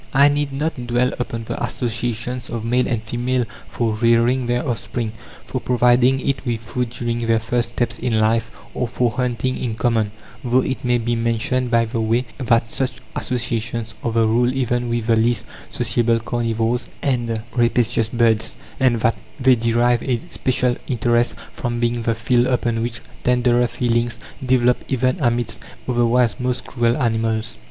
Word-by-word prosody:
I 140 +2 +7
need 145 -1 0
not 135 -3 -3
dwell 120 +2 +1
upon 115 -2 -3
the - - -4
associations 120 0 -2
of 115 -1 -4
male 125 +2 +2
and 115 -3 -1
female 120 +2 -1 0.2
for 115 -2 -1
rearing 115 +3 +3
their 120 +3 0
offspring, 115 -2 -2 0.3
for 130 - -4
providing 125 +1 +3
it 135 -1 0
with 120 -4 -2
food 125 +1 -3
during 120 0 -3
their 115 -1 +2
first 120 +1 -1
steps 120 -1 -1
in 115 -3 +1
life, 115 +1 +2 0.2
or 125 - -1
for 120 0 0
hunting 125 0 -1
in 115 -4 -3
common; 115 -3 +1 0.3
though 125 +1 +3
it 130 - -3
may 125 -1 +2
be 120 0 -1
mentioned 115 +2 0
by 115 -1 +3
the 115 0 -2
way 115 +3 +1
that 115 -2 +2
such 130 -2 -1 0.2
associations 115 -2 -2
are 115 - 0
the 115 0 +3
rule 120 +3 +3
even 120 -2 -1
with 115 -1 -1
the 115 -1 +3
least 115 0 +1 0.2
sociable 115 -1 +1
carnivores 115 +1 -1
and 120 -4 0 0.2
rapacious 120 -2 +2
birds; 115 -2 +2 0.2
and 125 -4 +3
that 115 - +3 0.3
they 130 0 +5
derive 120 0 +2
a 125 -3 0
special 125 -2 +1
interest 120 -1 +1 0.2
from 120 0 -3
being 120 0 0
the 115 0 0
field 120 +2 +2
upon 120 -3 0
which 115 0 -3 0.2
tenderer 125 -1 +3
feelings 120 -1 0 0.3
develop 125 -1 +3
even 130 +1 +1
amidst 120 -4 +1 0.3
otherwise 120 0 +2
most 125 0 -2
cruel 120 -2 +1
animals. 115 -3 -1
120 Hz, 165 wpm, -21 LUFS, 115-125 Hz, 0.3 s, I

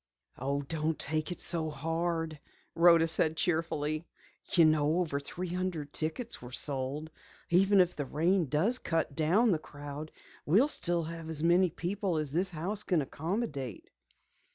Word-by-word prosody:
"Oh, 140 +2 -1
don't 155 +2 -2
take 155 +3 -2
it 175 - -5
so 165 -2 +3
hard," 165 +1 -2 0.3
Rhoda 170 -1 +6
said 160 -1 +2
cheerfully. 160 -2 -1 0.4
"You 170 -4 +6
know 155 +1 +3
over 160 -6 -1
three 175 +5 -6
hundred 180 -5 -3
tickets 165 +10 -2
were 120 0 -10
sold. 140 +3 -1 0.4
Even 195 +3 +5
if 180 -1 +3
the 145 -2 -4
rain 170 +4 +1
does 185 - +1
cut 165 -4 -1
down 190 +9 +3
the 165 - +1
crowd 145 +1 -8 0.3
we'll 215 - +4
still 175 - +1
have 165 0 -7
as 160 -1 +1
many 175 +2 +4
people 180 +1 -2
as 155 -3 -2
this 180 +5 +1
house 185 +5 -3
can 175 -8 +1
accommodate." 145 - -4
160 Hz, 155 wpm, -31 LUFS, 150-180 Hz, 0.4 s, Rhoda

